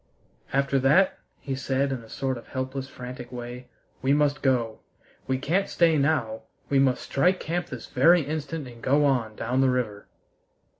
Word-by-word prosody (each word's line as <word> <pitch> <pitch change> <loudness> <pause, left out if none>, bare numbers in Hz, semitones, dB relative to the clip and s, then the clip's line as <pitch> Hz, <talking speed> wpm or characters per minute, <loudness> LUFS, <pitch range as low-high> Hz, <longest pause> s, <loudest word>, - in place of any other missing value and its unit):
"After 140 0 +2
that," 150 +9 +4 0.2
he 135 - -4
said 135 +1 0
in 130 - -2
a 115 - -15
sort 130 +2 -2
of 120 - -10
helpless, 130 +1 -4
frantic 125 -1 -9
way, 125 0 -7 0.3
"we 135 +1 +3
must 145 0 +2
go! 120 -5 +1 0.5
We 130 - +1
can't 170 +9 0
stay 165 -2 +3
now; 140 -7 +1 0.3
we 140 - +4
must 130 -2 +2
strike 180 +7 +2
camp 175 +2 -2
this 125 -7 -7
very 165 +6 +4
instant 150 0 -4
and 120 -1 -12
go 145 +2 +3
on 120 -6 +1
down 125 +5 0
the 135 - +4
river." 115 -5 -2
135 Hz, 170 wpm, -26 LUFS, 125-145 Hz, 0.5 s, that